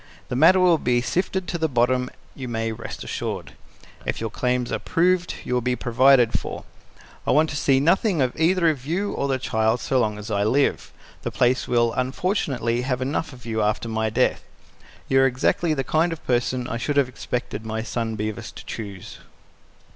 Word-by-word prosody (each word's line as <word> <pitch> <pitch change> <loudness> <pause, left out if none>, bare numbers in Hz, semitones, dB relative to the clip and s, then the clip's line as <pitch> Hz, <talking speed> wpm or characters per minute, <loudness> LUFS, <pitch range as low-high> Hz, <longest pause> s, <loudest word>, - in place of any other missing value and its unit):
The - - -2
matter 165 +8 +6
will 175 -3 +4
be 120 0 +2
sifted 185 +8 -1
to 170 - -2
the 160 0 +1
bottom, 125 0 +1 0.2
you 130 -2 -7
may 115 -1 -2
rest 110 - -7
assured. - - -4 0.5
If - - -3
your 115 -1 -3
claims 125 0 -1
are - - -1
proved, 180 +1 +1
you - - -3
will 125 - +2
be 125 +1 0
provided 125 0 +4
for. - - -6 0.6
I - - +1
want 155 +1 +3
to - - -5
see 135 -2 +3
nothing 175 +4 +2
of 130 -2 +1
either 170 +1 +3
you 165 +9 -3
or 140 - -2
the 135 -1 +1
child 110 -2 0
so 130 - 0
long 105 -3 0
as 105 +1 -7
I 100 -1 +1
live. 135 +7 +1 0.3
The - - -3
place 125 +1 +1
will 120 -1 +2
unfortunately 130 - -1
have 125 0 -1
enough 145 +4 -2
of 125 -2 -13
you 110 -1 -1
after 105 +2 0
my 110 -1 -1
death. - - +1 0.6
You 135 - +3
are 135 - +5
exactly 155 +5 +1
the 135 - -1
kind 160 +5 +1
of 165 - -7
person 125 0 0
I 115 - -3
should 145 +4 -2
have 140 -3 +4
expected 125 -3 -4
my 110 0 -3
son 115 -1 -3
Bevis 110 0 -4
to - - -11
choose." 100 -4 -7
125 Hz, 195 wpm, -23 LUFS, 115-150 Hz, 0.6 s, matter